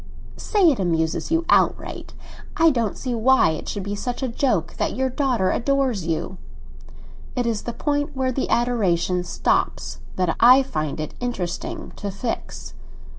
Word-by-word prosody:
"Say 390 -7 +3
it 265 - -2
amuses 165 -3 0
you 330 +1 +1
outright! - - +1 0.4
I 330 0 +6
don't 230 -6 -1
see 255 -2 -3
why 235 -6 +4
it 155 - -5
should 200 - -4
be 200 +1 -4
such 245 +5 -4
a - - +1
joke 230 - 0
that - - -1
your 260 0 0
daughter 250 -8 +1
adores 255 - 0
you." 170 +3 -3 1.0
"It 245 -2 0
is 225 -3 -1
the 235 - -4
point 290 +3 -1
where 260 -1 +1
the 260 +1 -2
adoration 185 -7 +1
stops - - -1 0.2
that 180 -3 0
I 255 +3 +7
find 155 - -3
it 155 - -4
interesting 195 -8 -4
to 205 - -4
fix." 200 +5 -5
235 Hz, 160 wpm, -23 LUFS, 180-265 Hz, 1.0 s, I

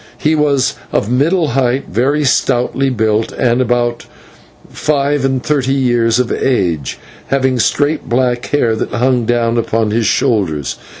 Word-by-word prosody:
He 155 - +1
was 145 -4 +1 0.2
of 110 - -1
middle 155 +5 +2
height, 130 +1 0
very 135 +9 0
stoutly 135 0 +1
built, 110 -2 0
and 120 +1 +1
about 120 -1 -1 0.6
five 145 -1 -1
and 135 -1 0
thirty 135 -3 0
years 120 -3 +2
of 125 -2 0
age, 90 - -1 0.3
having 130 -2 0
straight 145 +6 0
black 120 0 0
hair 120 -6 +1
that - - -3
hung 125 0 +1
down 120 -1 +1
upon 110 -1 -1
his 115 0 +1
shoulders. 85 - 0
125 Hz, 140 wpm, -15 LUFS, 115-135 Hz, 0.6 s, middle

